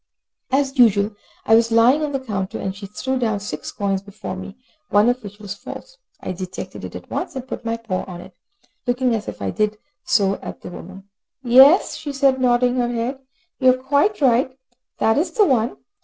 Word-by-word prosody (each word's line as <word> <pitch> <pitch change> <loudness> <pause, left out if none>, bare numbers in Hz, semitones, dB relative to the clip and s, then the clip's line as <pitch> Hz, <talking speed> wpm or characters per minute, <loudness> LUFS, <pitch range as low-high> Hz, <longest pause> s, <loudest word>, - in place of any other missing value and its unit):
As 270 0 0
usual, 210 -3 +5 0.3
I 225 - +3
was 230 +1 +5
lying 235 +6 +5
on 300 - -1
the 270 - -1
counter, 195 -7 -4
and 190 0 -4
she 200 0 -8
threw 260 +6 -3
down 220 -4 0
six 205 - -6
coins 195 -1 -1
before 200 -1 -7
me, 195 +3 -9 0.3
one 205 +3 +4
of 245 0 -1
which 205 0 -9
was 205 -2 -6
false. - - -10 0.2
I - - -5
detected 185 0 -7
it - - -7
at - - -10
once, - - -3
and 260 -1 -6
put - - -6
my 230 0 -2
paw 220 -5 -3
on 180 -2 -8
it, - - -13 0.5
looking 245 0 +1
as 220 -2 -2
I 95 -1 -2
did 215 - 0 0.3
so 195 -2 +2
at - - -8
the - - -8
woman. 195 +2 -10 0.4
"Yes," 265 +8 +6
she 290 -2 -6
said, 270 -1 +2
nodding 245 0 +3
her 240 -1 +1
head. 240 +3 -2 0.4
"You 255 -2 +5
are - - -9
quite 285 +9 +1
right, 255 0 +3 0.4
that 220 +4 +3
is 340 +3 0
the 420 - +4
one." 245 - +1
235 Hz, 200 wpm, -21 LUFS, 205-260 Hz, 0.5 s, Yes